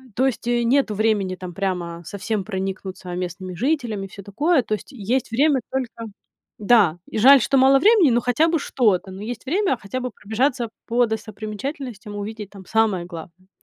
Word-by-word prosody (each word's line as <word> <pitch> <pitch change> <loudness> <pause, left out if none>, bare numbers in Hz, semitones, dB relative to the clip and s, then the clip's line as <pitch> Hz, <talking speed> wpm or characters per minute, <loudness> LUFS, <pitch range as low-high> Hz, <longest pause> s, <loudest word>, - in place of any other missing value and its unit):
То 260 +2 +3
есть 240 -2 -3
нету 240 0 +2
времени 205 -3 +1
там 180 -1 -8
прямо 175 -3 -3
совсем 200 +2 -3
проникнуться 190 -2 -5
местными 180 +1 -5
жителями 235 - -1
и 195 - -11
всё 200 0 -11
такое. 285 - +2
То 215 - -1
есть 210 - -12
есть 240 +1 -1
время 280 +3 +3
только 240 -3 -4 0.5
Да. 205 -6 +4
И - - -5
жаль, 270 +4 +8
что 275 - +2
мало 270 +1 +6
времени, 400 - +5
но 240 +1 +2
хотя 250 +7 +2
бы 330 -2 +1
что-то. 205 -9 +1
Но 190 +1 -9
есть 230 +3 -6
время 370 +1 +1
хотя 235 +3 -5
бы 250 -1 -4
пробежаться 235 +4 -1 0.2
по 240 +1 +3
достопримечательностям, 220 +1 -6
увидеть 210 0 -6
там 195 -2 -12
самое 210 -5 +1
главное. 175 +1 -11
220 Hz, 175 wpm, -22 LUFS, 195-260 Hz, 0.5 s, жаль